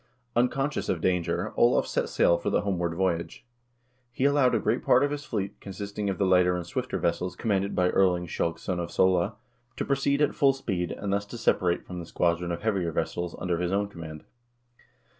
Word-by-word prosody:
Unconscious 135 Hz, +4 st, 0 dB
of 90 Hz, -, 0 dB
danger, 90 Hz, -1 st, 0 dB
Olav -, -, +4 dB
set -, -, -1 dB
sail 85 Hz, -, +4 dB
for -, -, -2 dB
the -, -, +2 dB
homeward 90 Hz, -4 st, -1 dB
voyage. 90 Hz, +1 st, -2 dB, 0.7 s
He 130 Hz, +3 st, -1 dB
allowed 140 Hz, -3 st, +4 dB
a -, -, +2 dB
great 110 Hz, +4 st, 0 dB
part 130 Hz, -, +5 dB
of 145 Hz, -, +1 dB
his 145 Hz, 0 st, -4 dB
fleet, 100 Hz, -6 st, -4 dB
con 100 Hz, -, -8 dB
sisting 100 Hz, +1 st, -4 dB
of 95 Hz, -, -2 dB
the 100 Hz, -, +1 dB
lighter 90 Hz, -1 st, +4 dB
and 90 Hz, -1 st, -4 dB
swifter 85 Hz, -, -3 dB
vessels 90 Hz, 0 st, -1 dB
commanded 100 Hz, -2 st, -1 dB
by 90 Hz, 0 st, +2 dB
Erling 90 Hz, -2 st, +2 dB
Skjalgs 85 Hz, 0 st, -2 dB
son 90 Hz, -2 st, -2 dB
of 85 Hz, -1 st, -3 dB
Sole, 95 Hz, +3 st, +2 dB, 0.4 s
to -, -, -2 dB
proceed 140 Hz, +1 st, +1 dB
at 150 Hz, -, +2 dB
full 135 Hz, -1 st, +4 dB
speed, 95 Hz, -10 st, -3 dB
and 100 Hz, -1 st, -3 dB
thus 100 Hz, +1 st, -1 dB
to 120 Hz, -, -8 dB
separate 90 Hz, -6 st, +1 dB
from 90 Hz, -1 st, -7 dB
the 85 Hz, -, -7 dB
squadron 85 Hz, 0 st, 0 dB
of 85 Hz, -, -4 dB
heavier 95 Hz, -6 st, 0 dB
vessels 85 Hz, +2 st, -2 dB
under 90 Hz, -2 st, -1 dB
his 90 Hz, 0 st, -1 dB
own 100 Hz, +1 st, 0 dB
command. 80 Hz, -5 st, -9 dB
95 Hz, 205 wpm, -27 LUFS, 85-110 Hz, 0.7 s, part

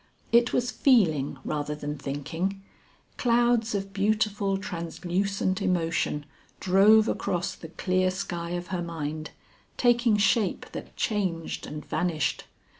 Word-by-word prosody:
It 235 Hz, +1 st, +5 dB
was 245 Hz, 0 st, 0 dB
feeling 160 Hz, -, +3 dB
rather 150 Hz, 0 st, -2 dB
than 150 Hz, 0 st, -4 dB
thinking; 150 Hz, +7 st, -3 dB, 0.6 s
clouds 235 Hz, -2 st, +2 dB
of 195 Hz, 0 st, -3 dB
beautiful 205 Hz, -1 st, +1 dB
translucent 185 Hz, +2 st, -2 dB
emotion 165 Hz, -4 st, 0 dB, 0.3 s
drove 210 Hz, +4 st, +5 dB
across 175 Hz, -1 st, -1 dB
the 165 Hz, -, -10 dB
clear 185 Hz, +2 st, +1 dB
sky 175 Hz, -2 st, -4 dB
of 175 Hz, 0 st, -7 dB
her 185 Hz, -2 st, -2 dB
mind, 155 Hz, -2 st, -4 dB, 0.5 s
taking 240 Hz, -3 st, +4 dB
shape 205 Hz, 0 st, +2 dB
that -, -, -8 dB
changed 185 Hz, -7 st, -2 dB
and 150 Hz, 0 st, -7 dB
vanished. 165 Hz, -5 st, -1 dB
185 Hz, 115 wpm, -27 LUFS, 165-210 Hz, 0.6 s, It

